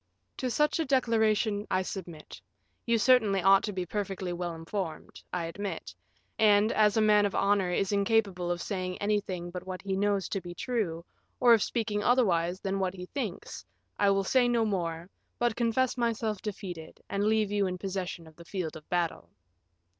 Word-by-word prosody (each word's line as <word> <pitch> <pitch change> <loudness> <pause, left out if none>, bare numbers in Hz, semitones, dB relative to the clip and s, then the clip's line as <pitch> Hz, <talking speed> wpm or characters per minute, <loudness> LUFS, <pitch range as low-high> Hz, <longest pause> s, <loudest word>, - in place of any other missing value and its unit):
"To 255 - -2
such 300 +6 +1
a 325 - +1
declaration 220 -5 +1
I 185 0 +1
submit. 170 -5 -8 0.5
You 235 0 +3
certainly 220 -4 +4
ought 195 +1 +6
to 210 - -3
be 185 -2 -3
perfectly 190 -2 -3
well 175 -1 -4
informed, 165 +1 -5
I 175 -2 -2
admit; 200 +4 -5 0.5
and, 210 0 +5
as 210 0 +3
a - - +4
man 210 -1 +5
of 200 - -6
honor 200 -2 +2
is 185 +2 0
incapable 200 -3 +1
of 175 -1 -2
saying 185 -3 -3
anything 195 -4 -2
but 180 +1 -7
what 185 -1 -6
he 195 -1 -1
knows 200 -1 +1
to 195 - -2
be 175 0 -8
true, 180 -10 -2 0.3
or 240 -2 +7
of 225 - +4
speaking 215 -2 -1
otherwise 185 -7 +2
than 195 -1 -2
what 190 -1 -1
he 180 -1 -7
thinks, 230 -11 -5 0.4
I 200 - +4
will 195 0 +2
say 245 +5 +3
no 235 -2 +2
more, 170 -5 -2 0.3
but 240 -2 +1
confess 240 +2 +1
myself 225 -3 -1
defeated, 180 -6 -7
and 200 0 -1
leave 215 -1 +2
you 205 -2 +1
in 180 0 -3
possession 185 -3 -4
of 160 -1 -16
the 170 - -11
field 180 -4 -4
of 155 -1 -12
battle." 175 -2 -1
200 Hz, 185 wpm, -29 LUFS, 180-220 Hz, 0.5 s, or